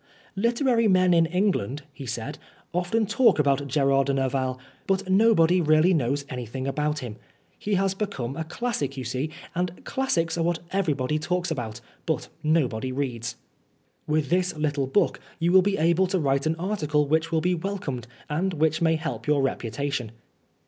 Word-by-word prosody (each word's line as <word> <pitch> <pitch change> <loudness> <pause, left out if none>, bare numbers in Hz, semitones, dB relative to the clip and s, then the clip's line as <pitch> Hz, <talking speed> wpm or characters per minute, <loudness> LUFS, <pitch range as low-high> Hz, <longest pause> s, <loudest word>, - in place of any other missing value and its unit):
" - - -28
Literary 235 +2 +2
men 185 -2 +4
in 165 -1 +4
England," 165 - 0
he 135 -1 -9
said, 120 +6 -5 0.3
"often 180 +6 +1
talk 230 +4 +4
about 140 -1 +2
Gerard 135 0 +2
de 140 - +1
Nerval, 130 -1 0 0.3
but 195 0 0
nobody 185 -3 +4
really 155 +3 +4
knows 140 -1 0
anything 125 +1 -5
about 150 +2 -1
him. 110 -3 -7 0.4
He 205 -1 0
has 195 0 +1
become 190 - -3
a 160 - -3
classic, 160 - -3
you 130 - -3
see, 130 +5 -2 0.2
and 180 0 -3
classics 170 -11 0
are - - +2
what 170 0 +1
everybody 155 -7 0
talks 180 +2 -1
about, 115 -7 -4 0.3
but - - -1
nobody 130 -6 +1
reads. 125 -3 -3 0.7
With 150 -2 0
this 180 -2 +1
little 145 -3 0
book 170 +10 +1 0.2
you 170 +1 +1
will 190 +1 +7
be 200 +1 0
able 170 +4 +3
to 190 +1 0
write 140 -1 +1
an 160 - +1
article 160 -5 0
which 160 +2 +1
will 165 - +2
be 180 +2 +2
welcomed, 165 - -4 0.2
and 175 +5 -1
which 155 +1 +1
may 165 -1 +3
help 160 -1 -4
your 145 -2 +3
reputa 135 +2 -2
tion." 120 -5 -3
155 Hz, 175 wpm, -25 LUFS, 135-185 Hz, 0.7 s, will